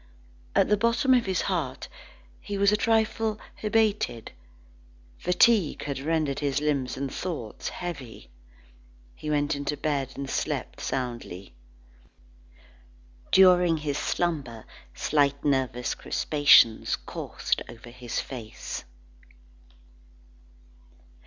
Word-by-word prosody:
At -, -, +4 dB
the 210 Hz, -, +3 dB
bottom 235 Hz, +4 st, +3 dB
of 245 Hz, -5 st, +3 dB
his 190 Hz, -1 st, 0 dB
heart, -, -, -2 dB, 0.5 s
he 205 Hz, -1 st, -5 dB
was 200 Hz, +1 st, +4 dB
a -, -, +4 dB
trifle 220 Hz, 0 st, +1 dB, 0.2 s
hebetated. 210 Hz, -, 0 dB, 0.9 s
Fatigue 180 Hz, -1 st, +3 dB
had 140 Hz, -2 st, -3 dB
rendered 150 Hz, -1 st, 0 dB
his 140 Hz, -2 st, 0 dB
limbs 145 Hz, -4 st, -1 dB
and 135 Hz, 0 st, -4 dB
thoughts 155 Hz, -, -5 dB
heavy. 145 Hz, -, -7 dB, 0.8 s
He 150 Hz, -, -7 dB
went 145 Hz, -1 st, +1 dB
in 140 Hz, -, -4 dB
to 150 Hz, -, -2 dB
bed 140 Hz, -3 st, -2 dB
and 140 Hz, 0 st, -5 dB
slept -, -, -3 dB
soundly. 120 Hz, -, -4 dB, 1.8 s
During 180 Hz, -3 st, +6 dB
his 150 Hz, -2 st, -2 dB
slumber 140 Hz, -10 st, -2 dB, 0.3 s
slight 140 Hz, -1 st, +1 dB
nervous 130 Hz, -4 st, 0 dB
crispations 145 Hz, -7 st, +4 dB
coursed -, -, -3 dB
over 120 Hz, +1 st, -11 dB
his 120 Hz, -1 st, -4 dB
face. 115 Hz, -5 st, -7 dB
145 Hz, 105 wpm, -27 LUFS, 130-185 Hz, 1.8 s, During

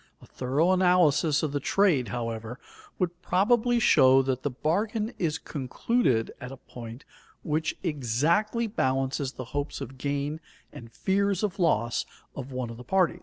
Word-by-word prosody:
A -, -, -16 dB
thorough 140 Hz, +8 st, 0 dB
analysis 175 Hz, -5 st, +3 dB
of 155 Hz, -, -1 dB
the 145 Hz, -, -1 dB
trade, 155 Hz, -, +2 dB
however, 115 Hz, +1 st, -4 dB, 0.4 s
would 175 Hz, -1 st, -2 dB
probably 240 Hz, +7 st, +2 dB
show 135 Hz, -, +5 dB
that 130 Hz, -1 st, -1 dB
the 145 Hz, -, -1 dB
bargain 210 Hz, -, -1 dB
is 160 Hz, -3 st, 0 dB
concluded 130 Hz, -, -1 dB
at 130 Hz, -1 st, -7 dB
a 135 Hz, -, -9 dB
point 120 Hz, 0 st, -10 dB, 0.4 s
which 155 Hz, +1 st, -1 dB
exactly 165 Hz, -, +1 dB
balances 135 Hz, -, -1 dB
the 130 Hz, -, -7 dB
hopes 145 Hz, +1 st, -3 dB
of 130 Hz, +2 st, -8 dB
gain 145 Hz, +2 st, -2 dB, 0.3 s
and 115 Hz, -1 st, -11 dB
fears 195 Hz, -, 0 dB
of 205 Hz, -2 st, -2 dB
loss 120 Hz, -, +1 dB, 0.3 s
of 135 Hz, 0 st, -7 dB
one 125 Hz, -2 st, -4 dB
of 115 Hz, -, -9 dB
the 125 Hz, -, -10 dB
parties. 180 Hz, +4 st, +1 dB
145 Hz, 155 wpm, -27 LUFS, 130-185 Hz, 0.4 s, show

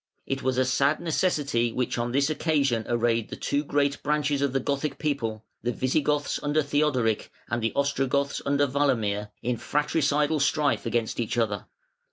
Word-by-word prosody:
It 135 Hz, -1 st, -2 dB
was 130 Hz, 0 st, 0 dB
a 130 Hz, -, +3 dB
sad 140 Hz, +4 st, +2 dB
necessity 145 Hz, -8 st, +1 dB
which 125 Hz, 0 st, -1 dB
on 120 Hz, 0 st, -1 dB
this 140 Hz, +3 st, +2 dB
one 155 Hz, -, -1 dB
occasion 140 Hz, -8 st, +1 dB
arrayed 115 Hz, -1 st, +1 dB
the -, -, -5 dB
two 145 Hz, +1 st, -1 dB
great 140 Hz, -1 st, 0 dB
branches 145 Hz, -1 st, 0 dB
of 140 Hz, -2 st, +1 dB
the 135 Hz, -, +1 dB
Gothic 140 Hz, +3 st, -2 dB
people, 115 Hz, -8 st, -2 dB, 0.2 s
the 120 Hz, -, -1 dB
Visigoths 145 Hz, +4 st, 0 dB
under 150 Hz, +1 st, +1 dB
Theodoric, 140 Hz, -6 st, +1 dB, 0.2 s
and 120 Hz, 0 st, 0 dB
the 115 Hz, -, 0 dB
Ostrogoths 140 Hz, 0 st, 0 dB
under 140 Hz, +1 st, +2 dB
Walamir, 115 Hz, -7 st, 0 dB
in 120 Hz, 0 st, 0 dB
fratricidal 150 Hz, +2 st, +1 dB
strife 145 Hz, -2 st, +1 dB
against 115 Hz, 0 st, -1 dB
each 120 Hz, 0 st, -2 dB
other. 105 Hz, -4 st, -1 dB
140 Hz, 170 wpm, -26 LUFS, 120-145 Hz, 0.2 s, a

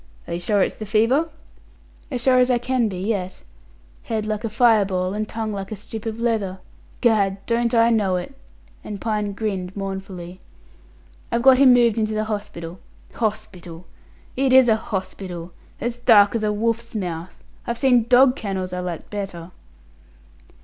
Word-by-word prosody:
"Are 170 Hz, -, -4 dB
you 170 Hz, -, -2 dB
sure 195 Hz, +2 st, +2 dB
it's -, -, -3 dB
the 215 Hz, -, -7 dB
fever?" 235 Hz, +10 st, +2 dB, 0.8 s
"As 250 Hz, -4 st, -3 dB
sure 255 Hz, 0 st, +4 dB
as 250 Hz, 0 st, +4 dB
I 250 Hz, -, +3 dB
can 245 Hz, -1 st, 0 dB
be 190 Hz, -3 st, -5 dB
yet. 190 Hz, -1 st, -3 dB, 0.6 s
Head 220 Hz, -2 st, -3 dB
like 215 Hz, 0 st, -3 dB
a 225 Hz, -, -2 dB
fire 225 Hz, -1 st, +4 dB
ball, 185 Hz, -1 st, -2 dB
and 215 Hz, +1 st, -3 dB
tongue 220 Hz, -1 st, -3 dB
like 195 Hz, 0 st, -6 dB
a -, -, -3 dB
strip 220 Hz, +2 st, -8 dB
of 225 Hz, 0 st, -4 dB
leather. 215 Hz, -5 st, -1 dB, 0.4 s
Gad, 205 Hz, -5 st, +2 dB
don't 235 Hz, 0 st, +1 dB
I 230 Hz, 0 st, +5 dB
know 205 Hz, -5 st, +2 dB
it?" 180 Hz, +9 st, -4 dB, 0.5 s
and 205 Hz, -2 st, -6 dB
Pine 210 Hz, -2 st, -2 dB
grinned 195 Hz, -3 st, -4 dB
mournfully. 190 Hz, -2 st, -6 dB, 0.9 s
"I've 235 Hz, 0 st, 0 dB
got 260 Hz, -1 st, +7 dB
him 270 Hz, -2 st, +7 dB
moved 235 Hz, -2 st, +3 dB
into 215 Hz, 0 st, -1 dB
the 215 Hz, -, 0 dB
hospital. 205 Hz, -5 st, -6 dB, 0.3 s
Hospital! 190 Hz, -6 st, -4 dB, 0.5 s
It 265 Hz, 0 st, +2 dB
is 260 Hz, -1 st, +7 dB
a 220 Hz, -, +5 dB
hospital! 185 Hz, -4 st, -5 dB, 0.3 s
As 240 Hz, 0 st, -3 dB
dark 210 Hz, -4 st, +6 dB
as 230 Hz, -2 st, -1 dB
a 210 Hz, -, +1 dB
wolf's 230 Hz, +2 st, -2 dB
mouth. 175 Hz, -3 st, -5 dB, 0.3 s
I've 235 Hz, -, -2 dB
seen 245 Hz, -3 st, +3 dB
dog 250 Hz, +1 st, +6 dB
kennels 190 Hz, -6 st, -4 dB
I 180 Hz, -, -3 dB
liked 180 Hz, -2 st, -6 dB
better." 190 Hz, -4 st, -6 dB
215 Hz, 170 wpm, -22 LUFS, 190-235 Hz, 0.9 s, got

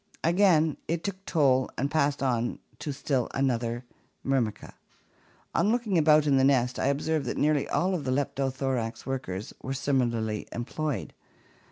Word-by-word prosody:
Again 165 Hz, -3 st, +4 dB
it 170 Hz, 0 st, -1 dB
took 195 Hz, -1 st, -4 dB
toll 130 Hz, -5 st, +3 dB
and 140 Hz, +3 st, -1 dB
passed 145 Hz, -2 st, +1 dB
on 120 Hz, -2 st, 0 dB, 0.2 s
to 150 Hz, -, -3 dB
still 135 Hz, -2 st, -1 dB
another 120 Hz, -2 st, 0 dB, 0.4 s
Myrmica. 130 Hz, -6 st, -1 dB, 0.8 s
On 210 Hz, -, +2 dB
looking 235 Hz, -5 st, 0 dB
about 155 Hz, -2 st, +5 dB
in 140 Hz, -2 st, +3 dB
the 130 Hz, -, +4 dB
nest, 130 Hz, -2 st, +2 dB
I -, -, +1 dB
observed 150 Hz, +2 st, 0 dB
that -, -, -2 dB
nearly 150 Hz, -1 st, +2 dB
all 185 Hz, +2 st, +1 dB
the 135 Hz, -3 st, -4 dB
Leptothorax 130 Hz, -4 st, -1 dB
workers 125 Hz, -8 st, -4 dB
were 130 Hz, -, -3 dB
similarly 120 Hz, -6 st, 0 dB
employed. 130 Hz, 0 st, -3 dB
135 Hz, 145 wpm, -28 LUFS, 125-155 Hz, 0.8 s, about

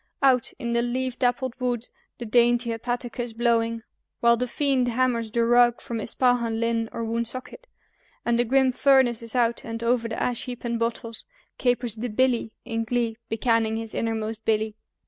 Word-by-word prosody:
Out 255 Hz, -3 st, +4 dB
in 235 Hz, 0 st, -3 dB
the 235 Hz, -, +2 dB
leaf 250 Hz, +1 st, -2 dB
dappled 245 Hz, 0 st, +1 dB
wood 245 Hz, -2 st, -2 dB, 0.3 s
the 240 Hz, -, -6 dB
dainty 240 Hz, +1 st, +3 dB
hepatica's 240 Hz, 0 st, -4 dB
blowing, 230 Hz, -1 st, +1 dB, 0.4 s
While 235 Hz, 0 st, +5 dB
the 250 Hz, +2 st, -2 dB
fiend 265 Hz, -1 st, +1 dB
hammers 240 Hz, -2 st, 0 dB
the 230 Hz, +1 st, +1 dB
rug 240 Hz, 0 st, +4 dB
from 230 Hz, -1 st, -4 dB
Ispahan, 235 Hz, -1 st, +1 dB
Lynn, 230 Hz, -1 st, 0 dB
or 230 Hz, -, -4 dB
Woonsocket, 235 Hz, -, -4 dB, 0.6 s
And 235 Hz, 0 st, +2 dB
the -, -, +4 dB
grim 260 Hz, +2 st, +3 dB
furnace 260 Hz, -3 st, +3 dB
is 230 Hz, +1 st, -4 dB
out, 235 Hz, -1 st, +1 dB
and 230 Hz, 0 st, -5 dB
over 235 Hz, 0 st, +1 dB
the 225 Hz, -, -4 dB
ash 245 Hz, -2 st, -1 dB
heap 245 Hz, -2 st, -7 dB
and 235 Hz, -1 st, -1 dB
bottles 230 Hz, -1 st, -2 dB, 0.4 s
Capers 245 Hz, -3 st, +1 dB
the 240 Hz, +3 st, -3 dB
"Billy" 240 Hz, 0 st, +1 dB
in 225 Hz, -1 st, -2 dB
glee, 230 Hz, -1 st, -1 dB
becanning 225 Hz, 0 st, +1 dB
his 225 Hz, -1 st, -5 dB
innermost 225 Hz, -1 st, -2 dB
Billy. 220 Hz, -1 st, 0 dB
235 Hz, 170 wpm, -25 LUFS, 230-245 Hz, 0.6 s, While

